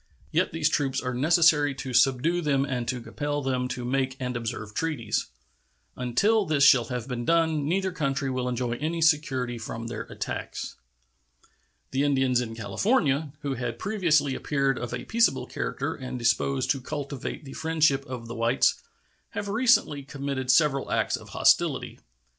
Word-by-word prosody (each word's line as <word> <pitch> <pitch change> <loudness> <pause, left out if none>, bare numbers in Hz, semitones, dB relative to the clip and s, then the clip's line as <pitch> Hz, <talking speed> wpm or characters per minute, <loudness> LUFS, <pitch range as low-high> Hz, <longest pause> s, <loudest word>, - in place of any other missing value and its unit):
Yet - - +1
these 160 -2 +1
troops 140 -3 0
are 125 -1 -3
necessary 150 +1 +4
to 130 -1 -6
subdue 135 +8 +3
them 140 -3 +1
and 125 -4 -3
to 125 0 -2
compel 145 +5 -3
them 130 -1 0
to 125 -1 -5
make 130 +1 -1
and 125 -1 -3
observe 110 -2 -4
treaties. 115 -7 -1 0.7
Until 200 - +2
this 155 -6 +1
shall 130 -4 +6
have 125 0 -4
been 125 -2 -3
done 160 -1 +2
neither 190 +2 0
country 140 -5 -1
will 130 -1 -1
enjoy 125 -1 -2
any 160 +4 -2
security 135 -7 +1
from 115 +1 -6
their 115 - -5
attacks. - - -5 1.2
The 135 - 0
Indians 130 -3 +2
in 115 -2 -5
California, 145 - +1
who 140 -2 -2
had 120 -2 -4
previously 165 - +1
appeared 140 -1 0
of 120 - -5
a 125 - -5
peaceable 230 +1 +2
character - - -3
and 130 -2 -6
disposed 125 +3 +1
to 135 - -2
cultivate 140 +1 -5
the 135 - -9
friendship 155 -4 +2
of 125 -2 -6
the 115 - -6
whites, 115 +2 +2 0.6
have 205 - -3
recently 215 - +3
committed 140 -1 -4
several 135 0 +3
acts - - +1
of - - -10
hostility. - - +2
135 Hz, 160 wpm, -26 LUFS, 125-155 Hz, 1.2 s, shall